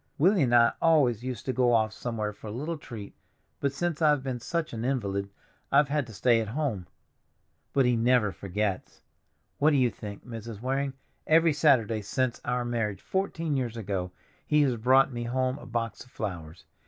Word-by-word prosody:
Willie 185 +5 +4
and 120 -3 +3
I 115 -1 +6
always 135 -9 +3
used 125 -4 -5
to 130 - -1
go 125 0 +3
off 110 -2 +2
somewhere 105 0 -3
for 110 - -11
a - - -5
little 150 +9 -3
treat, 110 -9 -9 0.5
but 140 - 0
since 170 +2 -2
I've 150 -3 +3
been 130 -2 -3
such 160 +5 -3
an 115 0 -4
invalid 100 -7 -1 0.4
I've 140 +1 +4
had 145 -3 0
to 115 - -10
stay 115 +2 +3
at 110 - -4
home. 115 - -2 0.8
But 135 -2 +3
he 125 -1 +3
never 115 -2 +3
forgets. 100 0 -3 0.6
What 150 - +5
do 150 - +2
you 125 -3 +3
think, 100 -1 -9
Mrs. 115 -3 -7
Waring, 135 +3 -1 0.3
every 165 0 +5
Saturday 115 -6 +3
since 125 +4 -1
our 125 0 -1
marriage, 115 -4 -2
fourteen 165 -5 -1
years 120 -3 -2
ago, 95 -4 -3 0.4
he 150 -1 +4
has 130 -4 +1
brought 130 +3 +4
me 120 0 -4
home 130 +3 -1
a 125 - -11
box 115 -2 -3
of 130 - -21
flowers! 85 -9 -6
120 Hz, 190 wpm, -28 LUFS, 110-140 Hz, 0.8 s, I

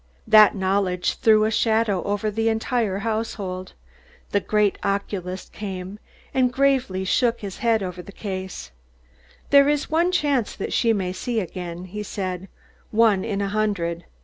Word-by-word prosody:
That 215 -2 +7
knowledge 190 -2 0
threw 215 -1 +5
a 220 - 0
shadow 220 -4 +2
over 205 +1 -1
the 225 +2 +1
entire 220 -2 0
household. 200 -5 -3 0.6
The 200 - +3
great 210 0 +1
oculist 195 -2 -3
came, 195 0 -6 0.3
and 255 -2 +2
gravely 260 -8 +1
shook 235 +4 +1
his 200 -2 -7
head 225 -3 +2
over 180 -1 -5
the 200 - -12
case. 190 - -6 0.8
"There 280 0 +7
is 295 +1 0
one 340 +3 +3
chance 285 - +1
that - - -4
she 230 - +3
may 190 -4 -1
see 230 +5 -2
again," 180 -2 -6
he 210 +3 -6
said, 190 -2 -4 0.4
"one 215 -4 +3
in 205 -3 -2
a 200 - -1
hundred. 195 -5 -1
205 Hz, 150 wpm, -23 LUFS, 185-225 Hz, 0.8 s, That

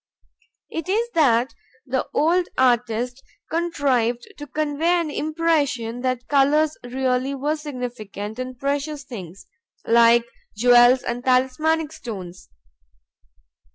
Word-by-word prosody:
It 330 +2 -5
is 460 +4 0
that 255 -5 +3 0.3
the 260 -1 -2
old 340 +4 +2
artist 245 0 +1 0.3
contrived 275 -8 0
to 290 - -7
convey 310 +4 0
an 320 -3 -2
impression 295 -8 -1
that 255 -2 -2
colors 295 +2 +3
really 255 +2 -1
were 290 +3 -1
significant 245 -7 -6
and 255 0 -5
precious 285 +2 -2
things, 190 -7 -9 0.4
like 235 0 +5 0.3
jewels 245 +2 +6
and 245 0 -4
talismanic 265 +5 +1
stones. 185 -6 -8
260 Hz, 105 wpm, -22 LUFS, 240-300 Hz, 0.4 s, jewels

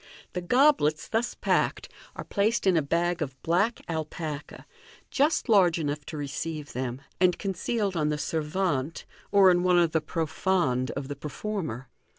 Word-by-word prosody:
The 180 - -2
goblets 245 - +3
thus 230 +2 -1
packed - - 0 0.3
are - - -5
placed 215 +3 0
in 190 -2 +4
a 160 - +4
bag 170 +4 0
of 135 -3 -4
black 200 +8 +1
alpaca, 155 -2 -5 0.5
just 290 +3 +2
large 190 -7 +5
enough 150 -2 -3
to 155 - -6
receive 150 +1 -5
them, 125 +1 -4 0.2
and 180 -1 +3
concealed 200 +1 -2
on 150 -2 +1
the 150 - -1
servante, 155 -1 -2 0.3
or 195 -2 +7
in 175 0 +3
one 180 0 +3
of 170 -2 +3
the 160 - +1
profondes 160 -5 0
of 140 0 -5
the 145 - -5
performer. 150 - -5
165 Hz, 160 wpm, -27 LUFS, 150-190 Hz, 0.5 s, or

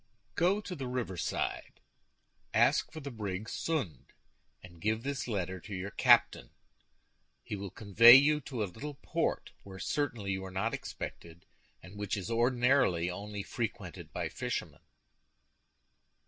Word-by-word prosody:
"Go 190 +5 +2
to 190 -3 -6
the 135 -5 -5
riverside, 120 -8 -3 0.8
ask - - +3
for 155 - -8
the 140 0 -6
brig 105 -3 -4
Sund, 140 - -3 0.6
and 85 -2 -14
give 110 +2 0
this 140 -1 -3
letter 95 -4 -2
to 95 +1 -7
the 100 - -5
captain; - - +4 0.9
he - - -5
will 100 0 -6
convey 110 +5 +8
you 150 +2 +5
to 125 -5 -3
a - - +1
little 140 +10 -7
port, 140 - -2
where 95 -1 -11
certainly 120 -4 -2
you 95 0 -2
are 95 - -6
not 95 +5 -1
expected, 85 0 -7 0.4
and 95 +3 -12
which 105 0 -2
is 100 +3 -5
ordinarily 120 -7 +2
only 100 +2 -6
frequented 110 -6 -5
by - - -2
fishermen." - - -4
110 Hz, 140 wpm, -31 LUFS, 95-130 Hz, 0.9 s, convey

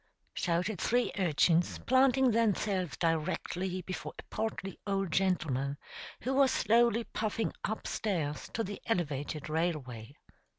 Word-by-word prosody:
shouted 180 +3 -1
three 245 +1 +2
urchins, 170 0 +3
planting 260 0 +4
themselves 205 -5 +1
directly 180 +3 -1
before 185 +1 -5
a - - -8
portly 195 -4 -3
old 195 -3 0
gentleman 145 -8 +1 0.4
who 260 - -1
was 270 0 +5
slowly 235 0 +3
puffing 220 +1 -2
up 220 - -3
stairs 155 -9 -2
to 225 - -1
the 200 0 -6
elevated 150 -7 -1
railway. 150 -8 -2
185 Hz, 120 wpm, -31 LUFS, 160-220 Hz, 0.4 s, was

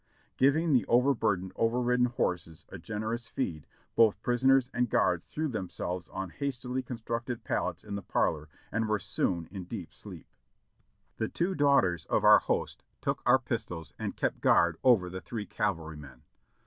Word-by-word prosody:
Giving 150 +4 +3
the 125 - +4
over 125 +4 +4
burdened, 100 -6 -1
over 115 +2 +1
ridden 125 0 +2
horses 90 -8 -3
a - - -8
generous 110 +2 -4
feed, 80 - -4 0.3
both 110 -3 +4
prisoners 130 +1 +3
and 125 -1 +1
guards 90 -5 +1
threw 155 +1 -2
themselves 90 - -4
on 95 -2 -5
hastily 130 -2 -3
constructed 120 -1 -4
pallets 90 -5 -2
in 105 - -7
the 100 - -3
parlor 80 -4 0 0.2
and 110 0 -1
were 105 - +2
soon 95 -4 -1
in 95 -2 -6
deep 90 -6 -7
sleep. - - -11 0.9
The 110 - -1
two 180 +3 -1
daughters 140 - +3
of - - +1
our - - +8
host - - -2 0.2
took - - -2
our - - +7
pistols 80 -3 -5
and - - -4
kept - - -1
guard 85 -1 +4
over 115 -8 +5
the 95 +1 -6
three 105 +5 -5
cavalrymen. 80 -11 -4
110 Hz, 160 wpm, -30 LUFS, 90-125 Hz, 0.9 s, our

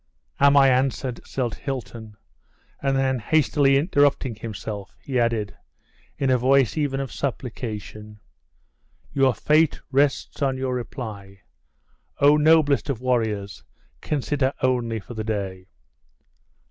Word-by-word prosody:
"Am 140 0 +5
I 135 -1 +7
answered?" 130 -1 0
said 125 -4 -2
Hilton, 115 -6 -6 0.6
and 135 -1 +1
then 130 -1 +1
hastily 140 +2 +3
interrupting 145 -4 +2
himself, 105 -2 -7
he 130 -3 -2
added, 115 -3 0 0.6
in 135 -2 +1
a 125 - +3
voice 130 -2 +3
even 145 -3 -1
of 135 -1 -4
supplication; 110 -5 -5 0.9
"your 135 -3 +3
fate 155 0 +2
rests 140 +2 0
on 135 -2 +1
your 130 -1 -2
reply! 105 -6 -7 0.8
Oh! 145 +1 +5
noblest 150 -2 +3
of 130 -5 -2
warriors, 110 -6 -1 0.4
consider 140 -2 -1
only 120 -3 0
for 110 - -10
the 110 -1 -4
day!" 95 -4 -4
130 Hz, 120 wpm, -23 LUFS, 110-140 Hz, 0.9 s, I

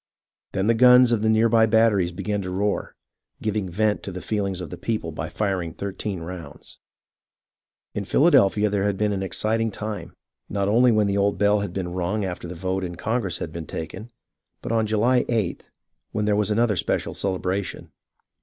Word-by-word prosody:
Then 95 - 0
the 115 - +4
guns 125 +1 +7
of 115 -3 +2
the 110 - +2
near 110 +1 +4
by 115 -1 +4
batteries 110 -5 +3
began 105 +3 -3
to 95 - -5
roar, 100 +2 -2 0.4
giving 105 -3 -2
vent 105 +4 0
to 100 - -6
the 90 - -6
feehngs 100 -2 -2
of 90 - -6
the 90 - -6
people 105 -5 -2
by 80 +1 -5
firing 95 -6 -2
thirteen 100 -1 -4
rounds. 80 -3 -9 1.1
In 100 - -3
Philadelphia 115 - +4
there 100 -1 0
had 100 -2 0
been 105 0 +1
an 95 - -2
exciting 110 +4 0
time, 105 -5 -6 0.3
not 100 0 -1
only 120 +4 +5
when 110 -2 +3
the 100 0 0
old 100 0 +1
bell 105 +1 +3
had 100 - -3
been 90 -2 -4
rung 95 +3 -1
after 90 -1 -5
the 90 - -7
vote 95 +2 -2
in 85 -1 -4
Congress 105 -3 -2
had 80 - -5
been 80 -2 -6
taken, 95 +8 -6 0.5
but - - -4
on 110 -1 +1
July 115 +4 +3
Sth, 110 -7 -1 0.5
when 105 - 0
there 105 -1 +2
was 105 0 +1
another 110 +1 +2
and 90 - -2
special - - -1
celebration. 95 0 -3
100 Hz, 190 wpm, -24 LUFS, 95-110 Hz, 1.1 s, guns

